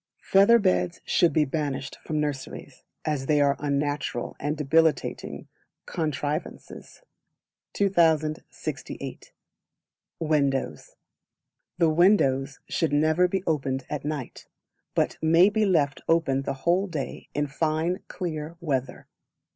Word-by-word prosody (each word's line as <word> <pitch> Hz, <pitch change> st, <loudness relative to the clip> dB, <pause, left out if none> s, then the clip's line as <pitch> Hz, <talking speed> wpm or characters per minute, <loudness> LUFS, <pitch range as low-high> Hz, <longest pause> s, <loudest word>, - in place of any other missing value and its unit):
Feather 200 Hz, +4 st, +6 dB
Beds 185 Hz, -4 st, +1 dB
should 170 Hz, -, +3 dB
be 155 Hz, 0 st, +3 dB
banished 140 Hz, -1 st, -3 dB
from 155 Hz, -1 st, -2 dB
nurseries, 145 Hz, -3 st, -5 dB, 0.2 s
as 145 Hz, -4 st, -1 dB
they 150 Hz, -1 st, +3 dB
are 140 Hz, -1 st, +3 dB
unnatural 145 Hz, -3 st, -2 dB
and 150 Hz, +2 st, -2 dB
debilitating 160 Hz, +2 st, 0 dB, 0.4 s
contrivances. 155 Hz, -, -4 dB, 0.7 s
2068. 160 Hz, -6 st, -1 dB, 0.9 s
Windows. 145 Hz, -4 st, -1 dB, 0.8 s
The 170 Hz, -2 st, +4 dB
Windows 145 Hz, -6 st, +3 dB
should 165 Hz, -, 0 dB
never 155 Hz, +4 st, +3 dB
be 190 Hz, +1 st, -2 dB
opened 135 Hz, -4 st, -1 dB
at 150 Hz, -, -3 dB
night, 145 Hz, -4 st, -5 dB, 0.5 s
but -, -, 0 dB
may 165 Hz, +4 st, +5 dB
be 215 Hz, 0 st, +1 dB
left 145 Hz, -7 st, +1 dB
open 160 Hz, -5 st, +2 dB
the 135 Hz, -, -3 dB
whole 180 Hz, +4 st, +3 dB
day 155 Hz, -7 st, -5 dB
in 145 Hz, -, +1 dB
fine 160 Hz, +5 st, -1 dB
clear 160 Hz, -2 st, -5 dB
weather. 135 Hz, -6 st, -3 dB
155 Hz, 110 wpm, -26 LUFS, 140-170 Hz, 0.9 s, Feather